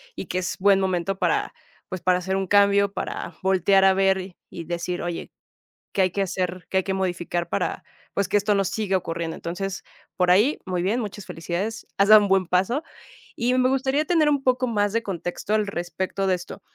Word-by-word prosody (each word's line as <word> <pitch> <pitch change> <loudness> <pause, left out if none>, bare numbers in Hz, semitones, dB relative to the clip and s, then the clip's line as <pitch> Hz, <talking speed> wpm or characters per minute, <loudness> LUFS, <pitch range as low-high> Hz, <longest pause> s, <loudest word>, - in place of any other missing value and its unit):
y - - -5
que 180 - -2
es 185 - -3
buen 195 0 +5
momento 190 0 -1
para, - - 0 0.4
pues, 185 -2 -5
para 180 0 +2
hacer 190 +1 -2
un 195 -1 -1
cambio, 200 0 +4
para - - -5
voltear 190 +1 +3
a 190 - +6
ver, 190 -1 +1
y 170 - -7
decir: 175 +1 -3
"Oye, 175 -1 -5 0.6
¿qué 195 - +2
hay 185 -2 +2
que 200 - -1
hacer? 185 -1 -2
¿Qué 190 - 0
hay 190 - +2
que 190 - -2
modificar? 175 -2 -2
para, - - -2 0.3
pues, 200 -2 0
que 205 - +2
esto 205 0 +1
no 195 - +2
siga 195 0 0
ocurriendo". 165 -2 -4
Entonces 190 +3 -5 0.3
por 180 -1 +3
ahí, 220 +11 +4
muy 180 -2 -2
bien, 210 +7 0
muchas 205 -2 -6
felicidades, 175 +7 -4
has 200 +1 +3
dado 215 -1 +10
un 205 - 0
buen 190 -1 +3
paso. 195 - +1 0.5
Y 245 +2 +1
me 255 0 +3
gustaría 270 +3 +1
tener 315 -3 +3
un 285 -2 +1
poco 255 0 +2
más 205 -2 0
de 230 - +1
contexto 185 +2 -4
al 215 -1 +1
respecto 185 +2 -3
de 185 - +3
esto. 175 - -9
190 Hz, 210 wpm, -24 LUFS, 180-205 Hz, 0.6 s, dado